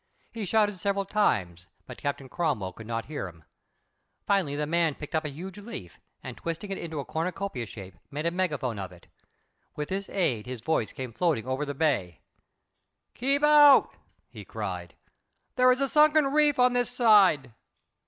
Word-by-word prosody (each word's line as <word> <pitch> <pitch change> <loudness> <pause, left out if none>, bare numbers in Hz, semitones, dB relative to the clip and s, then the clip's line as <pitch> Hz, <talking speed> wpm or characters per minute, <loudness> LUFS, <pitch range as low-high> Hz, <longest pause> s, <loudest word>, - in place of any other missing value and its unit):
He 225 -3 -5
shouted 205 -1 +1
several 200 0 -1
times, 90 - 0 0.2
but - - -10
Captain 140 -1 -3
Cromwell 130 - -2
could 110 +3 -11
not 115 -1 -3
hear 145 -9 -5
him. 80 -3 -14 0.8
Finally, 190 -8 +1
the 150 +1 -1
man 165 -1 +1
picked 150 - -9
up 160 0 0
a - - -2
huge 185 +7 -8
leaf, 205 - -9 0.2
and, - - -7
twisting 170 +5 -5
it 195 - -3
into 160 -3 -5
a 140 - -4
cornucopia 165 - -3
shape, 95 -5 -11
made 150 +3 -5
a 170 - +1
megaphone 150 - -2
of 95 -2 -6
it. 90 -1 -16 0.7
With 150 0 -4
this 195 +1 -3
aid 125 - -1
his 125 -3 -6
voice 120 -6 0
came 130 -3 -7
floating 150 -3 0
over 130 +3 -2
the 145 -1 -5
bay. 130 - 0 0.9
"Keep 275 +4 0
off!" 295 -2 +6 0.3
he - - -10
called. - - -6 0.6
"There 255 0 +5
is 255 +2 +1
a 275 - +2
sunken 305 +1 +5
reef 300 -1 +3
on 250 0 +4
this 245 -1 +1
side. 190 - +4
160 Hz, 175 wpm, -27 LUFS, 125-205 Hz, 0.9 s, off